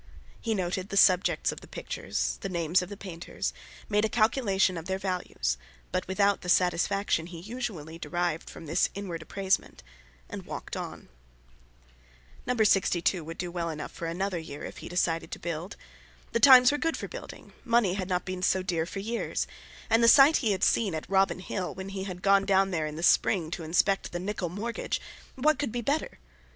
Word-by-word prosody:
He 225 -2 -1
noted 185 +1 -2
the 200 - -2
subjects 185 -1 +4
of - - -9
the - - -13
pictures, - - -3
the 195 - -3
names 170 0 +1
of 180 - -6
the 205 - -8
painters, 175 -4 -5 0.3
made 210 0 +2
a 220 - +2
calculation 215 -5 +2
of 165 -1 -6
their 190 0 -1
values, 180 - -2 0.3
but 185 - -1
without 200 +1 +2
the 180 - -6
satisfaction 180 -1 +2
he 175 -2 -9
usually 185 -7 -6
derived 175 -2 -2
from 165 - -10
this 160 +4 +2
inward 185 -5 -5
appraisement, 190 - -1 0.4
and - - -8
walked - - -6
on. - - -7 1.4
No. 250 0 0
62 185 -5 +2
would 165 +2 -8
do 175 -1 -4
well 170 -1 -2
enough 155 -1 -5
for 170 - -5
another 180 +2 -2
year, 155 -3 -8
if - - -8
he - - -8
decided 170 -2 0
to - - -4
build! 170 +3 -5 0.6
The 230 - +1
times 250 0 +9
were 295 - -1
good 330 +2 0
for - - -5
building, - - -10
money 230 -6 +3
had 190 -1 -3
not 180 -1 0
been 185 -1 -4
so 185 0 +2
dear 170 -3 -1
for 195 - -7
years; 230 +3 -2 0.4
and 225 +1 +3
the - - +6
site 275 +5 +8
he 225 -5 +1
had 190 -2 -1
seen 200 -7 +2
at 155 - -5
Robin 195 -1 +2
Hill, 185 0 -4
when 190 +1 -6
he 195 -1 -4
had 180 -2 -7
gone 195 0 +4
down 195 0 +3
there 160 -3 -1
in 150 - -6
the 165 - -5
spring 175 -2 +3
to 175 - -4
inspect 185 +5 +1
the 175 - -3
Nicholl 190 -1 -3
mortgage—what 235 - -2
could 280 -6 -1
be 240 +1 -2
better! 285 +6 -1
190 Hz, 195 wpm, -28 LUFS, 175-210 Hz, 1.4 s, times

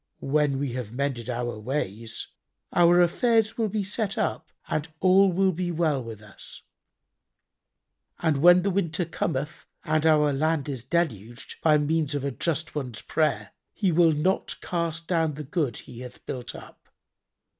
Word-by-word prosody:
When 145 -1 +1
we 135 -3 -2
have 125 -4 -5
mended 130 -3 -2
our 120 -2 -3
ways, 115 -3 -4 0.4
our 175 0 +6
affairs 225 +5 +2
will 225 -2 0
be 210 0 -1
set 200 0 -2
up - - -1 0.2
and 155 +1 -2
all 190 +1 +5
will 190 +2 +2
be 180 +1 -3
well 155 -6 0
with 110 -2 -9
us, 105 -2 -10 1.5
and 160 -4 +1
when 175 +2 +7
the 200 - +1
winter 175 -2 0
cometh 155 -2 -3 0.2
and 155 -1 +1
our 150 -2 +4
land 155 0 0
is 130 -5 -4
deluged, 125 - -3
by 155 -2 +5
means 150 0 0
of 140 - -2
a 140 - -1
just 160 +4 -2
one's 125 -7 -5
prayer, 105 -10 0 0.2
He 195 -4 +1
will 165 0 +5
not 165 +6 0
cast 165 -1 -3
down 160 -4 +1
the 150 - -6
good 145 -5 -1
He 120 - -11
hath 125 -1 -10
built 125 -1 -6
up. - - -13
155 Hz, 160 wpm, -26 LUFS, 130-175 Hz, 1.5 s, when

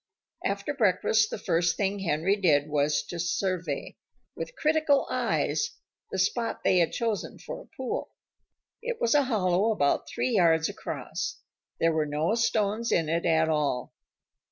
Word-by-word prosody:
After 200 +8 -1
breakfast 215 -2 +2
the - - -4
first 170 -2 +1
thing 200 0 0
Henry 175 +1 +1
did 155 -8 +3
was 145 0 +1
to 170 +3 -7
survey, 180 0 -2 0.4
with - - -6
critical 310 -2 +2
eyes, 450 +2 0 0.4
the - - -4
spot 230 +5 0
they 185 - +4
had 170 -2 +2
chosen 225 -3 -2
for - - -7
a - - -20
pool. 260 -2 -3 0.7
It 480 0 -4
was 230 - +2
a 290 -2 +4
hollow 205 -3 +2
about 145 -10 +1
three 255 - -1
yards 160 -3 +4
across. - - -5 0.4
There 165 0 +3
were 155 -1 0
no 150 +7 0
stones 225 0 +1
in 165 -2 +2
it 170 +1 0
at 160 -1 +3
all. 150 -5 -1
185 Hz, 155 wpm, -27 LUFS, 160-225 Hz, 0.7 s, they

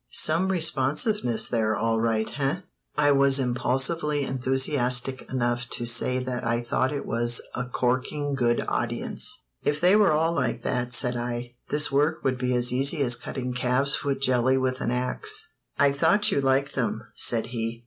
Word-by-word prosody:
Some 170 +5 +2
responsiveness 155 - +1
there, 110 -2 0
all 115 0 0
right, 110 -1 0
eh?" 140 +6 -1 0.4
I 145 -1 +4
was 140 -1 +4
impulsively 135 +4 0
enthusiastic 130 0 0
enough 120 -1 -1
to 120 - -3
say 120 +2 +1
that 125 -1 -4
I 120 +1 -1
thought 130 +3 0
it 145 - -4
was 120 +1 +2
a 125 - -3
"corking 130 +4 -2
good 120 -3 0
audience." - - -3 0.2
"If 145 0 0
they 180 +4 +4
were 210 -5 +4
all 160 +2 +1
like 125 -5 -2
that," 125 -1 -2
said 125 0 +1
I, 120 0 -4 0.2
"this 150 0 +1
work 150 +4 +1
would 130 -1 -1
be 125 0 0
as 125 0 +2
easy 140 +4 +2
as 120 -2 +3
cutting 125 0 -5
calves 125 +3 +1
foot 135 -1 -2
jelly 130 0 +2
with 130 -1 -2
an - - -1
ax." 125 - -1 0.3
"I 140 0 +4
thought 205 +9 +3
you 140 - +1
liked 135 +1 +1
them," 110 -3 -2
said 115 -2 +3
he. 115 0 -4
130 Hz, 170 wpm, -25 LUFS, 120-140 Hz, 0.4 s, I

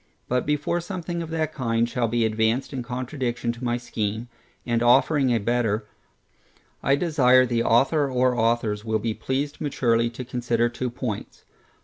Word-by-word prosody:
But 125 +1 0
before 150 +4 0
something 175 -1 -4
of 165 - -6
that 160 -1 -2
kind 115 -3 0
shall 120 0 -1
be 115 0 +1
advanced 110 +5 0
in 130 - -3
contradiction 125 -1 -3
to 120 +2 -10
my 120 -1 0
scheme, 115 -1 -3 0.4
and 120 -1 0
offering 135 +3 +4
a 120 - +3
better, 115 -1 0 1.0
I 135 - +3
desire 130 -5 +4
the 120 -1 0
author 135 +6 +3
or 125 0 +2
authors 115 -2 0
will 110 -1 0
be 110 +1 -2
pleased 140 +5 -3
maturely 120 -5 +1
to 120 +2 -7
consider 120 -1 0
two 125 +1 -3
points. 120 -3 -6
120 Hz, 160 wpm, -24 LUFS, 115-135 Hz, 1.0 s, offering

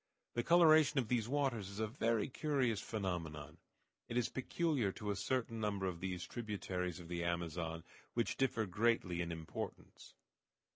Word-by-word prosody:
The 120 - +1
coloration 155 -2 +6
of 120 -5 +1
these 115 -3 +1
waters 130 -8 0
is 100 +1 -7
a 110 - +2
very 115 -1 +1
curious 130 -6 +1
phenomenon. 80 -8 -4 0.5
It 120 0 -2
is 120 - +2
peculiar 130 - 0
to 105 -1 -3
a - - -1
certain 115 +3 -1
number 100 -3 -1
of 90 -3 -2
these 90 -1 -3
tributaries 95 -6 -3
of 85 - -9
the 85 0 -2
Amazon, 85 -1 -2 0.3
which 115 -1 +1
differ 120 -4 +1
greatly 100 -3 +1
in 85 0 -2
importance. 80 -1 -7
105 Hz, 155 wpm, -37 LUFS, 90-125 Hz, 0.5 s, coloration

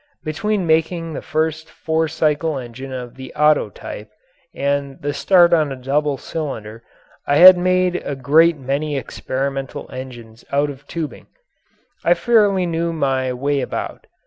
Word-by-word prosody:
Between 195 +5 -1
making 165 +1 0
the - - -5
first 160 0 -2
four 160 0 -1
cycle 155 0 0
engine 130 +1 -8
of 125 -2 -6
the 130 0 -9
Otto 150 0 +3
type - - -9 0.4
and 140 -1 -2
the 145 -2 -3
start 170 +5 +4
on 155 -4 +2
a - - -3
double 140 +2 -1
cylinder 115 -9 -6 0.5
I 145 - +3
had 185 +4 +10
made 185 0 +1
a 140 - -5
great 155 +5 +4
many 140 +2 -2
experimental 135 +1 -4
engines 120 -3 -9
out 145 +1 +1
of 140 0 -14
tubing. 160 -3 -6 0.8
I - - +4
fairly 205 -6 +3
knew 170 0 -1
my 135 -5 0
way 140 +3 -1
about. - - -5
145 Hz, 145 wpm, -20 LUFS, 135-165 Hz, 0.8 s, had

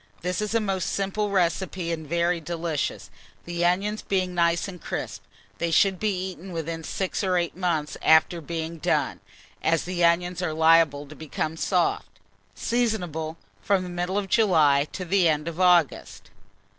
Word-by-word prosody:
This 180 +2 -2
is 210 +1 -2
a - - +4
most 195 -4 -1
simple 200 +2 -1
recipe 180 -1 0
and 160 -2 -4
very 170 +2 +1
delicious, 165 -2 -3 0.3
the 175 0 -2
onions 195 +5 +1
being 185 -2 -1
nice 170 +1 +1
and 180 -4 -9
crisp. 100 -5 -5 0.4
They 170 - 0
should 190 +2 +3
be 190 -3 -1
eaten 185 +1 -11
within 165 0 -4
6 190 +5 -3
or 185 -2 +2
8 170 -2 -1
months 170 -5 -1
after 160 +2 +4
being 165 +1 -5
done, - - 0 0.4
as 165 -1 +1
the 175 -1 -2
onions 175 +1 +2
are 160 -3 -1
liable 160 -2 +4
to 150 +2 -12
become 155 +1 -4
soft. 175 +1 0 0.5
Seasonable 180 -10 -1 0.2
from 195 -2 +1
the 180 - -6
middle 175 +2 -2
of 205 -1 -1
July 155 -10 +4
to 185 - -5
the 180 -1 +3
end 150 0 -1
of 170 +1 -5
August. 180 -5 +2
175 Hz, 165 wpm, -25 LUFS, 160-190 Hz, 0.5 s, a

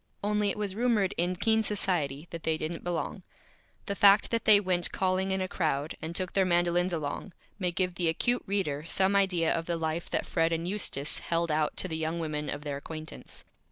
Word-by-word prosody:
Only 210 0 +1
it 200 - -2
was 205 -2 -2
rumored 220 -3 +1
in 175 +2 0
Keen 220 +4 +2
Society 175 -8 -1
that 170 - -6
they 160 -1 0
didn't 160 +2 -4
Belong. 175 -1 -3 0.6
The 200 - -2
Fact 200 +1 +5
that 230 -1 0
they 210 -2 +8
went 185 -3 +1
Calling 190 0 0
in 190 0 0
a 185 - -1
Crowd, 155 -4 -1
and 160 +1 -5
took 185 -1 -2
their 195 - +4
Mandolins 175 0 +2
along, 165 +3 -4 0.3
may 180 -2 0
give 180 +1 -1
the 175 -1 0
Acute 240 +9 +1
Reader 165 -7 -1
some 190 +4 +2
Idea 180 -5 +3
of 165 0 -3
the 170 -1 -1
Life 160 +1 -3
that - - 0
Fred 165 0 +1
and 165 +1 -1
Eustace 165 -7 0
held 170 -1 -1
out 150 0 0
to - - +2
the 160 -3 -3
Young 160 +1 -2
Women 150 -3 -3
of 145 0 -5
their 145 -2 -3
Acquaintance. 155 +2 -9
175 Hz, 210 wpm, -29 LUFS, 160-195 Hz, 0.6 s, they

